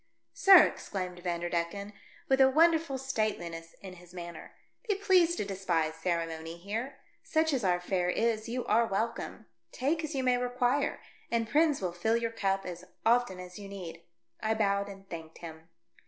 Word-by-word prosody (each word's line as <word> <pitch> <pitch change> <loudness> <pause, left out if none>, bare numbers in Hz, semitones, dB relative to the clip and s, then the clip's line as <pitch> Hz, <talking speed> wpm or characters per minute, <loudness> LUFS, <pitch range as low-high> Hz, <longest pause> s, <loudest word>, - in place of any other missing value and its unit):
" - - -52
Sir," 385 -4 +9
exclaimed 180 -2 -3
Vanderdecken, 175 +3 -2 0.3
with 265 0 +4
a 265 - +7
wonderful 320 -1 +3
stateliness 205 -10 -3
in 185 -2 -9
his 175 +1 -16
manner, 170 -2 -8 0.3
"be 410 - +3
pleased 365 -4 +3
to - - -1
despise 175 -5 -1
ceremony 165 -1 -3
here. 225 +9 -4 0.2
Such 320 -1 +1
as 255 -5 0
our 180 -2 +2
fare 180 0 0
is, 220 +2 0
you 245 +1 -3
are 230 +2 +3
welcome. 220 - -3 0.3
Take 310 +6 -1
as 310 -1 -4
you 265 - 0
may 250 -1 +3
require, 250 +2 0 0.3
and 230 -1 0
Prins 300 +1 +3
will 180 -2 -2
fill 220 +6 +1
your 230 -1 -2
cup 195 -3 -1
as 175 -1 -6 0.2
often 230 -5 +3
as 180 +1 -9
you 200 - -8
need." 175 -4 -8 0.4
I 220 0 +1
bowed 200 -2 +1
and 195 0 -11
thanked 165 -2 -8
him. 160 0 -10
200 Hz, 170 wpm, -30 LUFS, 175-250 Hz, 0.4 s, Sir